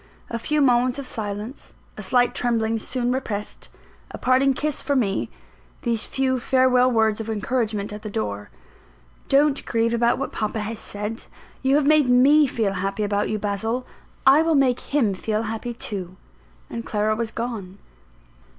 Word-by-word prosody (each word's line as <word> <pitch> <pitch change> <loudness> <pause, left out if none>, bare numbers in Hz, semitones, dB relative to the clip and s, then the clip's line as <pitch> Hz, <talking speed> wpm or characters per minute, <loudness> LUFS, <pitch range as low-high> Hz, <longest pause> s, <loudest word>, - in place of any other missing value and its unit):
A 230 - -2
few 300 +5 +1
moments 250 -1 +3
of 280 - -5
silence; 215 +2 -6 0.2
a - - -7
slight 245 -1 +2
trembling 225 -2 0
soon 245 +2 -2
repressed; 215 -5 -4 0.4
a - - -7
parting 260 +1 +3
kiss 300 +1 -1
for 285 - -1
me; 205 -7 0 0.5
these 230 -3 +1
few 260 -1 0
farewell 255 0 +3
words 220 -2 +2
of 225 0 -5
encouragement 215 -2 -1
at 210 - -7
the 215 - -6
door; 105 - -4 0.8
"Don't 280 0 +3
grieve 230 0 0
about 235 0 +2
what 275 - -3
papa 215 0 -2
has 215 +1 -5
said; 210 +2 -5 0.4
you 265 +1 +3
have 295 -1 +3
made 300 -3 +4
me 280 +4 +6
feel 220 -6 -1
happy 195 +2 -2
about 205 0 0
you, 215 - -1
Basil; 215 +4 -2 0.4
I 275 +3 +7
will 325 -1 +2
make 260 -3 +3
him 255 -9 0
feel 215 +3 -2
happy 225 +2 -4
too," 185 -5 -5 0.5
and 230 - -6
Clara 215 0 0
was 230 0 -2
gone. 220 -6 -5
230 Hz, 165 wpm, -23 LUFS, 210-260 Hz, 0.8 s, I